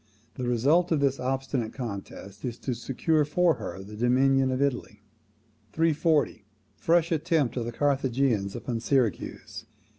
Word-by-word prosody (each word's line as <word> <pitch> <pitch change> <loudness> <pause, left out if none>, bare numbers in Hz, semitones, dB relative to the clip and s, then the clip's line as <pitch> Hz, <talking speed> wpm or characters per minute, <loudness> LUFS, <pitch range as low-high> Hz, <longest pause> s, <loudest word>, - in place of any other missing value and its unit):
The 125 - -4
result 145 +10 +2
of 160 - +3
this 140 -1 +1
obstinate 130 -2 -2
contest 100 -4 -7
is 120 -2 -4
to 130 - -2
secure 145 +6 0
for 170 +3 +2
her 95 +2 -6
the 105 +2 -10
dominion 130 +3 +3
of 130 0 -1
Italy. 140 -3 -2 0.7
340. 160 -7 +1 0.3
Fresh 170 0 +2
attempts 160 -4 +1
of 120 - -1
the 120 - -4
Carthaginians 130 -6 0
upon 120 -3 -3
Syracuse. 120 -2 -1
135 Hz, 140 wpm, -27 LUFS, 120-150 Hz, 0.7 s, of